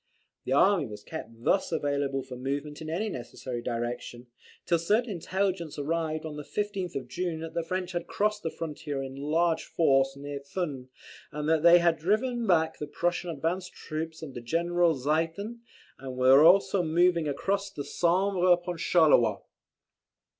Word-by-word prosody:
The - - -4
army 170 0 +4
was 105 -1 -9
kept 160 -7 -7
thus 190 +6 +2
available 140 -3 -1
for 130 -1 -9
movement 140 +4 -4
in 155 - -6
any 185 +7 -1
necessary 125 - -6
direction, 120 +1 -4 0.4
till 170 - +2
certain 215 +8 +1
intelligence 185 -2 -2
arrived 155 +1 -2
on 150 -1 -6
the 150 - -6
15th 200 -1 -3
of 130 -2 -4
June 170 +4 -3
that 165 0 -6
the 170 - 0
French 180 +2 -3
had 175 -1 -4
crossed 210 0 0
the 165 - -2
frontier 150 -4 -5
in 135 0 -7
large 160 +4 +1
force 135 -4 +2
near 140 0 -6
Thuin, 140 -3 -5 0.4
that 150 +1 0
they 170 +1 +8
had 170 -2 +2
driven 230 +7 0
back 160 -3 +2
the 150 - -4
Prussian 175 +4 -1
advanced 170 +4 -3
troops 160 +1 -6
under 135 -5 -7
General 170 +5 +1
Ziethen, 165 - -1 0.4
and 130 -1 -7
were 130 +3 +7
also 190 +3 +5
moving 170 0 +2
across 195 +8 -1
the 145 - -6
Sambre 180 +5 +1
upon 175 0 +1
Charleroi. 155 -8 +4
160 Hz, 160 wpm, -28 LUFS, 140-180 Hz, 0.4 s, they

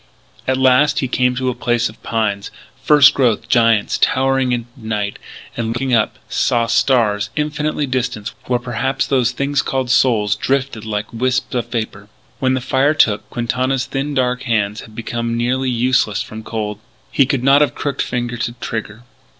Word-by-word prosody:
At 130 0 +2
last 130 +3 +4
he 130 - 0
came 125 0 +1
to 130 0 -1
a - - -1
place 120 -1 0
of 110 - -13
pines, 105 -3 -1 0.3
first 150 -2 +6
growth 115 -4 +1
giants 115 -4 +2
towering 135 -1 +2
into 120 -1 -2
night, 105 -4 -3 0.4
and, 115 -1 -2
looking 120 +3 -2
up, 110 -2 +2
saw 120 -1 +1
stars, 105 -5 +2
infinitely 150 0 -1
distant,... 125 -4 -3
where 125 - +1
perhaps 125 +2 -2
those 130 -4 +2
things 140 +1 0
called 130 -2 -2
souls 110 -6 +3
drifted 130 -1 -2
like 105 0 -4
wisps 130 +3 -1
of 120 -2 -1
vapour. 110 -4 -5 0.3
When 130 -1 +2
the 130 - -2
fire 135 +4 +2
took, 105 -6 +2
Quintana's 130 +3 -1
thin 140 +1 -3
dark 125 -1 +1
hands 110 -4 -1
had 110 - -14
become 115 0 -3
nearly 130 +2 0
useless 120 -4 +1
from 110 +1 -9
cold. 105 -2 -4 0.3
He 135 - +3
could 130 -2 -1
not 135 +2 +5
have 145 -5 +2
crooked 140 -1 -2
finger 120 -1 -2
to 120 0 -3
trigger. 115 -2 -6
125 Hz, 170 wpm, -18 LUFS, 110-130 Hz, 0.4 s, first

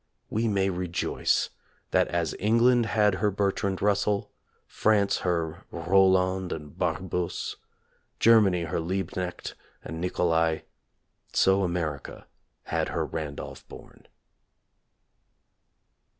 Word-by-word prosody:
We 115 +2 0
may 95 -2 +1
rejoice 90 -1 0 0.4
that - - +3
as 85 -2 -1
England 115 +3 +4
had 105 -3 +3
her 105 - +3
Bertrand 100 -1 -1
Russell, 100 0 +1 0.3
France 100 -2 +2
her 85 -1 -2
Roll 95 +2 +4
and 95 0 -1
and 75 -2 -6
Bar - - 0
busse, 90 -2 -3 0.6
Germany 105 -6 +5
her 80 0 -2
Liebknecht 90 +1 -3 0.3
and 80 0 -6
Nicolai, 85 -2 +1 0.7
so 95 +1 +4
America 80 -6 -3 0.4
had - - -1
her - - -1
Randolph 75 -3 -6
Bourne. - - -14
95 Hz, 105 wpm, -27 LUFS, 85-100 Hz, 0.7 s, Germany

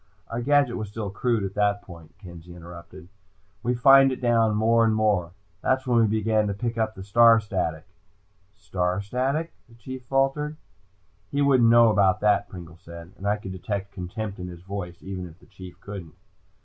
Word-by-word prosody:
"Our 115 +1 -3
gadget 140 -1 +2
was 110 -2 -5
still 105 -2 -5
crude 115 0 -1
at 95 0 -4
that 100 0 0
point," 85 -3 -14
Kenzie 85 -2 -12
interrupted. 85 +1 -12 0.5
"We 125 +1 -1
fined 135 +2 +6
it 130 - -4
down, 115 -3 +2
more 115 +2 +3
and 110 -1 +2
more. 100 -6 0 0.3
That's 130 0 0
when 120 -2 +2
we 115 - +4
began 110 0 +1
to 100 - -3
pick 115 +2 -3
up 110 -1 -1
the 95 - -8
star 115 +3 +5
static." 90 -7 -3 0.7
"Star 95 -2 -2
static?" 135 +10 -2 0.2
the 115 - -18
Chief 130 +2 -9
faltered. 135 +3 0 0.7
"He 145 0 0
wouldn't 130 -5 +4
know 115 -1 +6
about 100 -3 +3
that," 105 -1 +2
Pringle 85 -2 -11
said, 85 -1 -11
and 100 - -6
I 105 +1 +1
could 95 -2 -8
detect 100 +2 -5
contempt 100 +2 -6
in 90 - -6
his 85 -1 -11
voice, 90 -3 -6
even 95 -1 -6
if 80 -1 -15
the - - -20
Chief 90 -2 -12
didn't. 95 -5 -8
105 Hz, 190 wpm, -25 LUFS, 95-120 Hz, 0.7 s, fined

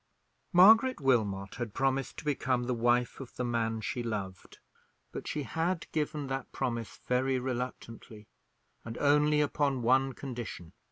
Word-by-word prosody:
Margaret 220 +8 +6
Wilmot 105 -8 +1
had 120 -4 -4
promised 135 0 0
to - - -8
become 130 -4 0
the 125 +1 -1
wife 120 +1 +1
of 135 -3 -10
the 125 - -2
man 115 -2 -1
she 120 - -3
loved; 100 -5 -5 0.5
but - - -7
she 150 - -2
had 165 - -2
given 150 -1 -2
that 135 0 -4
promise 115 -3 -3
very 130 +1 +1
reluctantly, 125 -3 -5 0.6
and 115 0 -7
only 150 +1 +3
upon 140 -3 0
one 130 +2 +3
condition. 120 -11 -7
125 Hz, 145 wpm, -30 LUFS, 115-145 Hz, 0.6 s, Margaret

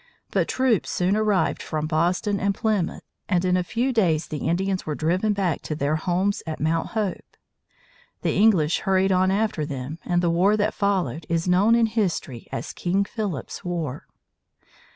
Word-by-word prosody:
But - - +1
troops 255 -6 +1
soon 185 +3 +1
arrived 210 -3 +1
from 155 -1 -3
Boston 175 +6 0
and 200 0 0
Plymouth, 215 -6 -1 0.3
and 180 -2 +2
in 180 0 +3
a 180 - +1
few 245 +8 -1
days 170 -8 +1
the 150 -1 -3
Indians 190 +2 0
were 150 - -3
driven 180 +8 +1
back 190 -6 0
to 155 - -4
their 145 +1 0
homes 180 +5 0
at 155 - -4
Mount 160 +1 0
Hope. 205 -4 -3 0.9
The - - +1
English 185 -8 +4
hurried 195 -1 +2
on 185 0 +3
after 200 -5 0
them, 145 +1 -5
and 175 0 0
the 170 - +2
war 190 +5 +3
that 210 +1 +1
followed 175 - -1
is 165 +1 0
known 195 +6 +4
in 235 -1 +4
history 195 - -2
as - - -5
King 190 +3 0
Philip's 200 - -5
War. 165 -7 -4
185 Hz, 175 wpm, -24 LUFS, 160-205 Hz, 0.9 s, English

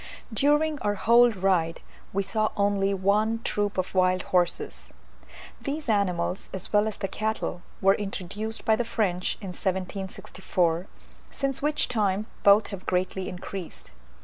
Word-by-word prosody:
During 295 +4 +2
our 205 0 0
whole 235 +4 +6
ride 185 -5 +1 0.3
we 200 +1 0
saw 215 +2 0
only 200 -1 +2
one 205 +4 +2
troop 205 -1 -1
of 185 - -1
wild 185 0 +3
horses. 170 - 0 0.7
These 280 +2 -4
animals, 190 -4 0
as 190 +2 -6
well 210 +1 +4
as 215 - -4
the 195 - -2
cattle, 215 -3 -2 0.2
were 195 +1 +6
introduced 205 +2 -4
by 220 - +5
the 240 - 0
French 205 -6 0
in 195 - -6
1764, 185 -2 -2 0.4
since 275 -1 -2
which 300 +1 +1
time 210 -3 0 0.2
both 200 +1 +6
have 195 -3 -8
greatly 185 +1 -1
increased. 180 - -7
200 Hz, 140 wpm, -27 LUFS, 185-220 Hz, 0.7 s, whole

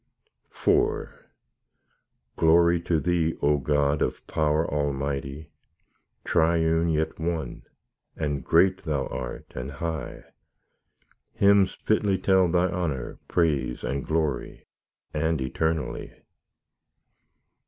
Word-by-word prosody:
IV - - +1 1.2
Glory 85 +1 +4
to 85 -2 +1
Thee, 80 +1 0
O 75 0 +2
God 75 +1 +1
of - - -2
power 80 +1 +1
almighty, 70 0 -3 0.7
Triune 80 0 +2
yet 80 0 -1
One, 80 -5 -3 0.5
and 75 -3 -2
great 95 +3 +3
Thou 75 -6 -1
art 60 -1 -7
and 65 +3 -5
high; 80 0 -5 1.1
Hymns 100 -1 +4
fitly 105 -3 +1
tell 95 -1 +3
Thy 90 +1 +2
honour, 85 -8 -3
praise, 70 -7 0
and 70 -1 -2
glory, 80 -5 -2 0.5
and 80 0 0
eternally. 80 +4 -2
80 Hz, 95 wpm, -26 LUFS, 70-85 Hz, 1.2 s, Glory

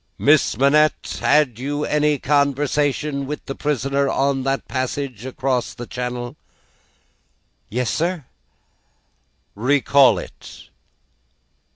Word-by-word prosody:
"Miss 145 -6 +3
Manette, 150 +4 +2
had 135 -7 +2
you 145 +3 -2
any 150 0 +1
conversation 140 0 0
with 150 +1 -6
the 135 - -4
prisoner 140 -1 -1
on 135 0 0
that 135 +1 -2
passage 130 -2 -4
across 130 -1 -2
the 120 - -7
Channel?" 125 +1 -5 1.3
"Yes, 120 -1 -1
sir." 170 +1 -2 1.3
"Recall 130 0 +4
it." - - -11
140 Hz, 95 wpm, -21 LUFS, 125-145 Hz, 1.3 s, Recall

